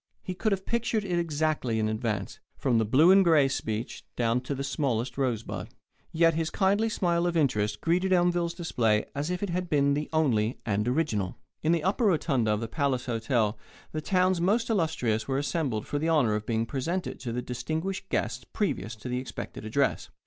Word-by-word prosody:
He 185 - -4
could 215 +4 -1
have 190 -1 -1
pictured 230 -2 0
it 175 -2 0
exactly 155 -7 0
in 110 -1 +1
advance, 110 -2 -2 0.2
from 120 -4 +2
the 110 - +2
Blue 145 - +5
and 195 0 +7
Gray 160 -6 +5
speech 115 -3 -3
down 120 +1 +1
to 135 +2 -4
the 135 - -3
smallest 130 -4 -1
rosebud. 125 -5 -2 0.4
Yet 165 0 +4
his 160 0 -1
kindly 205 +5 +2
smile 175 -4 +1
of 170 -1 0
interest 105 -9 +1
greeted 180 +3 +1
Elmville's 175 -1 +2
display 115 - +1
as 145 +3 -2
if 180 +2 -2
it 200 - -2
had 180 0 -2
been 140 -1 +3
the 150 +1 -2
only 125 -8 +1
and 105 0 0
original. 125 - 0 0.2
In 155 - +2
the 170 -2 +1
upper 200 +5 +1
rotunda 145 - +2
of 105 +1 0
the 115 - -3
Palace 135 -1 -1
Hotel 115 -2 0 0.3
the 155 - -3
town's 185 +2 +2
most 225 +6 +2
illustrious 155 - 0
were 135 -1 0
assembled 135 -6 -1
for 145 - -2
the 160 +2 0
honour 140 -9 +3
of 105 0 -3
being 115 -1 0
presented 165 +9 -3
to 120 - -4
the 125 +1 -3
distinguished 160 +11 -3
guests - - -1
previous 120 - -2
to 110 +3 -9
the 125 0 -1
expected 130 -4 -7
address. 110 - 0
145 Hz, 195 wpm, -28 LUFS, 115-170 Hz, 0.4 s, and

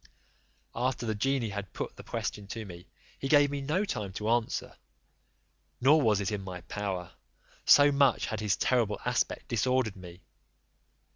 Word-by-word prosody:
After 125 0 -1
the 110 - 0
genie 125 +2 0
had 100 -3 -6
put - - -5
the - - -10
question 105 -1 -4
to 110 +2 -6
me, 90 -2 -11 0.3
he 135 - -3
gave 145 0 +5
me 140 -1 -3
no 155 +9 0
time 105 - -4
to 105 +3 -1
answer, 120 -1 -1 1.0
nor 145 +5 +5
was 110 -6 +3
it 100 +1 -1
in 105 -2 -2
my 90 -2 -7
power, 95 -1 -4 0.5
so 145 0 +7
much 140 -1 +3
had 110 - -4
his 105 -2 0
terrible 115 -5 +1
aspect - - -1
disordered 125 -1 +1
me. 90 -1 -12
110 Hz, 160 wpm, -29 LUFS, 100-135 Hz, 1.0 s, so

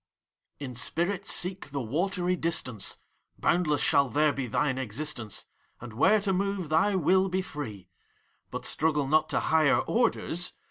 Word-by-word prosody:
PROTBUS. 145 - -6
In 125 - -7
spirit 170 - -1
seek 180 -3 -1
the 140 0 -3
watery 175 - -1
distance! 145 - -1 0.4
Boundless 165 -4 +1
shaU 140 -2 +3
there 150 +3 +2
be 135 -2 -3
thine 130 +2 0
existence, 125 -2 -3 0.3
And 120 -2 -9
where 210 - +4
to 195 -1 0
move, 195 -3 -1
thy 165 +6 +3
will 190 +2 +3
be 185 +1 -1
free. 110 - -7 0.6
But - - -5
struggle 150 -2 +1
not 155 +2 +2
to - - +1
higher 155 -3 +3
orders 180 -7 0
155 Hz, 150 wpm, -28 LUFS, 135-180 Hz, 0.6 s, where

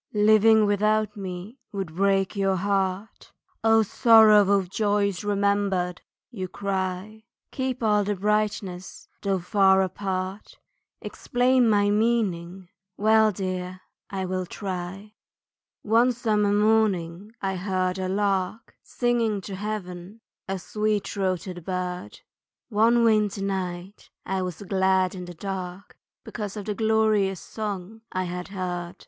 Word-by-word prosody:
Living 215 +1 +5
without 210 +1 +1
me 195 +5 -7
would 195 -6 -5
break 195 +1 +1
your 195 -1 +1
heart, 195 +2 -2 0.3
"O 225 0 +5
sorrow 215 -2 +6
of 190 -2 -2
joys 205 0 0
remembered!" 200 -3 0 0.3
You 190 -6 -5
cry, 195 +3 -4 0.3
Keep 260 -2 -3
all 210 -1 +3
the 205 +1 -1
brightness 200 -2 -2
though 195 -1 0
far 190 +1 +3
apart, 190 +1 -4 0.5
Explain 250 -1 +1
my 205 -1 +3
meaning 195 -5 0 0.3
well 220 +1 +4
dear, 185 -1 -4 0.3
I 190 -1 -3
will 185 0 -3
try. 190 +2 -6 0.7
One 230 +4 +4
summer 210 -3 +1
morning 205 -3 +1
I 195 -1 -2
heard 185 0 -1
a 185 0 -2
lark 200 +2 -1
Singing 235 -4 0
to 195 +1 -7
heaven, 195 0 -6 0.3
a 195 0 -2
sweet 210 +2 -1
throated 185 -2 -3
bird, 180 0 -5 0.5
One 230 +2 +3
winter 210 -3 +2
night 190 0 -4 0.2
I 190 0 -1
was 180 0 -5
glad 190 -1 +1
in 180 -2 -7
the 175 0 -10
dark, 190 +1 -6 0.3
Because 210 -2 -6
of 205 - -6
the 210 - -2
glorious 215 -3 +2
song 210 0 -6
I 185 - -1
had 180 0 -5
heard. 180 -3 -4
200 Hz, 125 wpm, -25 LUFS, 185-215 Hz, 0.7 s, sorrow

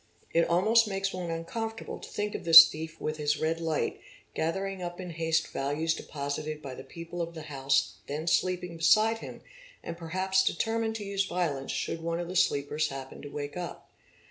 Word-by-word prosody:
It 170 0 +3
almost 215 +7 +4
makes 195 -1 -2
one 180 -2 -4
uncom 170 +8 -3
fortable - - -7
to - - -9
think 210 0 -3
of - - -5
this 165 -1 +12
thief 160 +1 -7
with 155 0 -3
his 150 -1 +1
redlight 160 -1 -1 0.3
gathering 190 +4 -2
up 175 0 -5
in 180 -2 -6
haste 160 0 +1
© - - -16
valuables 145 +4 0
deposited 150 +1 -4
by 135 -3 -7
the 130 - -9
people 170 +3 -7
of 170 0 -4
the 160 - -7
house 135 -2 0
then 150 +3 -4
sleeping 180 0 0
beside 220 +7 +4
him - - -9 0.4
and 170 - -5
perhaps 190 +3 +1
determined 225 +4 0
to 210 -2 -5
use 195 0 0
violence 165 -8 -2
should 165 - -3
one 165 +1 -2
of 175 0 -4
the 185 - -5
sleepers 150 -2 +2
happen 135 -2 -8
to 145 - -8
wake 145 0 -5
up. 180 -1 -7
165 Hz, 195 wpm, -29 LUFS, 155-185 Hz, 0.4 s, this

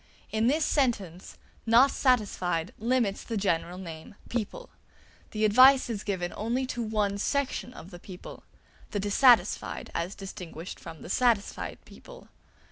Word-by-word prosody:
In 220 +1 +1
this 300 +4 +2
sentence 205 - -1 0.3
"not 245 +5 +6
satisfied" 185 - 0
limits 230 -3 0
the 230 - -4
general 180 -2 -1
name 165 0 -9
"people"; 245 - -4 0.6
the 215 0 0
advice 255 +4 +6
is 210 -2 -4
given 180 -4 -3
only 240 +5 -1
to 240 - -4
one 210 -3 -1
section 275 +1 -1
of 185 -6 -12
the 175 - -10
people: 180 0 -11 0.5
the 205 - -3
dissatisfied 230 +5 +3
as 170 +4 -3
distinguished 180 -3 -8
from 160 - -10
the - - -9
satisfied 235 -4 0
people. - - -14
210 Hz, 135 wpm, -28 LUFS, 185-250 Hz, 0.6 s, not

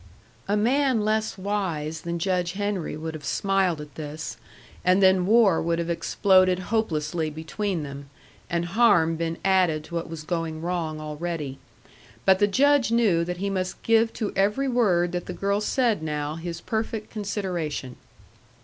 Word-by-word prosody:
A 205 - +1
man 250 0 +2
less 215 -1 0
wise 175 -6 -2
than 170 0 -3
Judge 180 0 0
Henry 200 -6 -2
would 160 +1 -5
have 155 -2 -8
smiled 195 -3 +1
at 150 -1 -9
this, 155 +1 -6 0.5
and 185 +1 +4
then 190 -1 +4
war 215 -5 +5
would 165 0 0
have 170 0 -2
exploded 185 +1 +3 0.2
hopelessly 160 -7 0
between 160 +3 -3
them, 140 0 -8 0.4
and 170 0 0
harm 175 -4 +4
been 165 0 -2
added 180 -5 +3
to 165 - -13
what 170 -1 -3
was 165 -2 -7
going 165 -1 -3
wrong 165 -2 -3
already. 150 -2 -4 0.7
But 190 -1 +5
the 205 - +4
Judge 275 +3 +3
knew 210 -8 +3
that 180 +1 -4
he 200 +2 -2
must 185 -1 -3
give 225 0 +3
to 215 -3 -3
every 210 +8 +1
word 190 -9 +2
that 175 -1 -4
the - - -4
girl 200 +1 0
said 230 - +1
now 150 -1 -2
his 165 +1 -6
perfect 220 -1 -3
consideration. 180 - -3
180 Hz, 160 wpm, -25 LUFS, 160-205 Hz, 0.7 s, war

